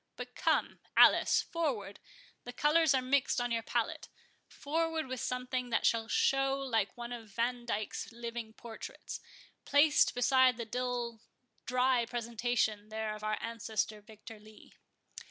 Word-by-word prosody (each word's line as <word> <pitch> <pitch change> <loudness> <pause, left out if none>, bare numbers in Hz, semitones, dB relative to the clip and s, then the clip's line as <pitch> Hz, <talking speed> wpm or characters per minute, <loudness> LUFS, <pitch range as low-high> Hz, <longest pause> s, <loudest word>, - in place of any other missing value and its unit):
—But - - -8
come, - - 0 0.2
Alice, - - +6
forward; 270 - -3 0.4
the 245 - -7
colours 295 +3 +3
are 260 - +1
mixed 265 0 +2
on 245 0 -1
your 230 -1 0
pallet—forward 315 +7 -3
with 260 -1 -5
something 250 0 -3
that 225 - +1
shall 225 -1 +2
show 270 +3 +2
like 235 -7 -1
one 240 0 -6
of 225 -3 -8
Vandyck's 235 0 -2
living 235 -1 -6
portraits, 225 -1 -8 0.4
placed 295 -1 +4
beside 255 0 +4
the 235 - -4
dull 240 -1 -3 0.5
dry 250 -1 +2
presentation 230 -3 -1
there 220 0 -3
of 215 0 -9
our 215 0 0
ancestor 220 -2 -3
Victor 220 +1 -12
Lee." 215 0 -17
240 Hz, 135 wpm, -32 LUFS, 225-255 Hz, 0.5 s, Alice